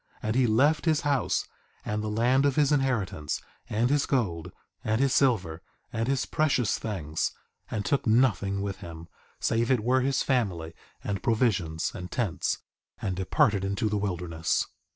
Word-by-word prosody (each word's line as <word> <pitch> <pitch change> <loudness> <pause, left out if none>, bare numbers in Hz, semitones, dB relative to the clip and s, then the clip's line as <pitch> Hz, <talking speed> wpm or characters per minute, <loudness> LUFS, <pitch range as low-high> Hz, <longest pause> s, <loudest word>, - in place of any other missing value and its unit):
And 110 +1 -1
he 130 -1 +4
left 145 +9 +3
his 160 -1 +3
house, 140 -6 +1 0.4
and 105 0 -1
the 110 - -3
land 120 +5 +3
of 140 - 0
his 150 -1 +3
inheritance, 120 - 0 0.3
and 120 +4 +1
his 145 -1 +2
gold, 90 - -1 0.3
and 110 +1 +1
his 135 -1 +2
silver, 95 - +2 0.3
and 115 0 -1
his 135 -1 +1
precious 145 -7 +1
things, 80 -8 -2 0.4
and 105 -2 -3
took 140 -3 0
nothing 100 -4 +2
with 100 -2 -3
him, 85 -2 -10 0.3
save 115 +1 +1
it 130 -4 +3
were 130 +3 +3
his 135 +1 +1
family, 95 - 0 0.3
and 100 -2 -2
provisions, 105 -9 +1
and 90 -2 -7
tents, 115 -9 -1 0.4
and 95 -3 -2
departed 95 +2 +2
into 100 +2 0
the 105 - 0
wilderness. 90 -4 -1
110 Hz, 160 wpm, -28 LUFS, 95-130 Hz, 0.4 s, he